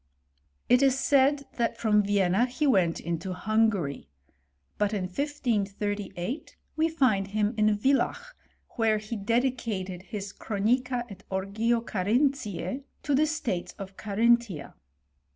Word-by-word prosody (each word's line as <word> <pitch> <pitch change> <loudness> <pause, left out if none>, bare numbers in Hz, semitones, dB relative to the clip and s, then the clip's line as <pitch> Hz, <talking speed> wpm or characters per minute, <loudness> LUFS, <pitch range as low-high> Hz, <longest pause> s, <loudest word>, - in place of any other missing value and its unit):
It 250 +1 +5
is 270 -1 +4
said, 280 +1 +3
that 235 -2 0
from 210 -2 +3
Vienna 200 +2 +2
he 260 +5 -2
went 185 - +3
into 170 +2 -3
Hungary; 195 - 0 0.7
but 210 +1 +1
in 195 - -1
1538, 205 - -2 0.2
we 320 +1 +2
find 250 -12 +2
him 210 +2 0
in 215 -1 +3
Villach, 275 - 0 0.4
where 220 -2 +3
he 215 +2 -5
dedi 235 +5 +1
cated 190 -7 -4
his 200 0 -6
Chronica 240 +4 0
et 200 -3 -12
Origo 210 +5 0
Carinthise 225 - 0 0.2
to 290 - 0
the 300 +3 +4
states 250 - -2
of 195 -1 -9
Carinthia. 215 -5 +1
215 Hz, 125 wpm, -28 LUFS, 195-250 Hz, 0.7 s, It